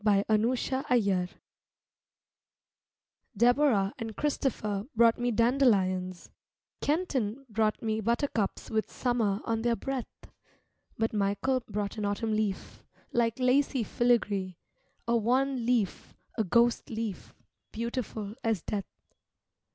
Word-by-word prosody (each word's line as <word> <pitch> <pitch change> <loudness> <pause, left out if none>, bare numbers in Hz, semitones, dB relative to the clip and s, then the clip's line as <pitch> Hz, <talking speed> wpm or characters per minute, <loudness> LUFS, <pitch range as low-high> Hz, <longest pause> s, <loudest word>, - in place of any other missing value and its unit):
Vigils 215 +4 +2
TRIBUTE 215 -9 +1 2.1
Deborah 240 -4 +3
and 225 -1 -5
Christopher 220 -8 -1
brought 230 +1 +5
me 245 0 +1
dandelions, 200 -7 +2 0.5
Kenton 275 - -1
brought 215 -1 0
me 220 0 0
buttercups 235 -1 -1
with 220 -1 -1
summer 225 -5 0
on 225 -1 0
their 235 0 +2
breath, 260 +2 -3 0.9
But 225 0 0
Michael 205 +6 +1
brought 205 +1 -3
an 210 - -1
autumn 210 +2 -1
leaf, 215 -3 -2 0.3
like 235 0 +1
lacy 260 0 +2
filigree, 205 -7 +1 0.5
A 235 - +3
wan 250 +2 +1
leaf, 235 -6 0 0.2
a 220 - +1
ghost 235 +5 +2
leaf, 220 -3 -5 0.4
beautiful 225 -3 -4
as 225 -6 0
death. 200 -2 -3
225 Hz, 105 wpm, -29 LUFS, 205-245 Hz, 2.1 s, brought